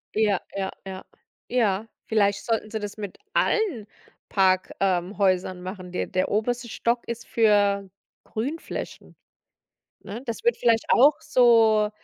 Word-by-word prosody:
Ja, 210 -4 +2
ja, 190 -1 -2
ja, 190 -1 -7 0.4
ja. 220 -3 +1 0.2
Vielleicht 205 -2 +2
sollten 225 -2 -1
sie 220 - -2
das 205 0 -6
mit 205 -3 -7 0.2
allen 350 - +1 0.4
Park, 185 -2 +2
ähm, 185 0 0
Häusern 185 -1 +1
machen. 185 -1 -7
Der 180 - -2
der 185 -2 -1
oberste 240 +3 -1
Stock 235 +2 -1
ist 235 0 -6
für 205 -3 +3 0.4
Grünflächen, 275 +9 -6 0.8
ne? 225 +5 -8
Das 230 - -5
würde 475 - +2
vielleicht 230 -2 +2
auch 285 +4 +5
so, 225 -4 +4
215 Hz, 135 wpm, -25 LUFS, 195-235 Hz, 0.8 s, auch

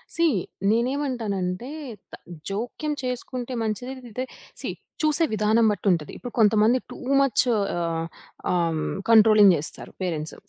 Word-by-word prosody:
See 335 - +3 0.5
నేనేమంటానంటే 235 -5 -1 0.4
త - - -7 0.3
జోక్యం 245 +9 -3
చేసుకుంటే 250 0 -4
మంచిది 225 +4 -3 0.2
ఇంతే. 250 +4 -4 0.4
సీ - - -4 0.3
చూసే 310 +1 +3
విధానం 215 +2 +3
బట్టి 205 0 -3
ఉంటది. 160 -4 -1
ఇప్పుడు 245 - -7
కొంతమంది 215 +3 +5
టూ - - -9 0.2
మచ్ 270 -4 +3
ఆహ్, 170 -5 -1 0.5
ఆహ్, 175 -2 +2
హ్మ్, 155 - -2 0.2
కంట్రోలింగ్ 215 -3 +7
చేస్తారు 150 - -6
పేరెంట్స్. 160 -4 -3
215 Hz, 125 wpm, -25 LUFS, 185-250 Hz, 0.5 s, కంట్రోలింగ్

